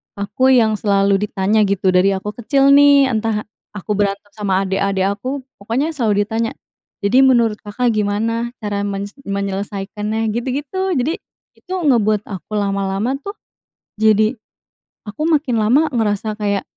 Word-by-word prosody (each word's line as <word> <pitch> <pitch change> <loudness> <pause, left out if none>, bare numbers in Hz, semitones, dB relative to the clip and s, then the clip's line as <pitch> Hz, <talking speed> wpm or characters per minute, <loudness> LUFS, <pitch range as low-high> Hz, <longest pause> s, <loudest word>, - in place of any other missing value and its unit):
aku 205 +6 0
yang 225 -5 +4
selalu 200 -1 +2
ditanya, 200 +2 +1
gitu, 195 -1 +1
dari 185 +2 +3
aku 200 +2 -4
kecil, 275 +4 +3
nih. 280 -2 +6
Entah 220 -1 -1 0.3
aku 205 +1 -5
berantem 205 0 -1
sama 195 -2 -1
adik-adik 195 0 0
aku, 255 +7 -4 0.2
pokoknya 245 +10 -1
selalu 215 -8 +1
ditanya, 225 +2 -2 0.5
"Jadi, 210 +6 +3
menurut 235 -5 +3
Kakak 235 +4 -1
gimana, 225 +3 -1
cara 205 -1 -2
menyes 200 0 -4 0.2
menyelesaikannya?" 200 +2 -3
Gitu-gitu. 285 - -2
Jadi, 285 +6 -1 0.3
itu 370 - -17
ngebuat 225 - +2
aku, 200 +2 -6
lama-lama 200 +5 -1
tuh, 400 +8 -7 0.7
jadi, 215 0 +4 0.7
aku 220 +10 -3
makin 295 -7 +1
lama 270 +9 +3
ngerasa 215 -3 -1
kayak, 200 -1 0
215 Hz, 135 wpm, -18 LUFS, 200-250 Hz, 0.7 s, nih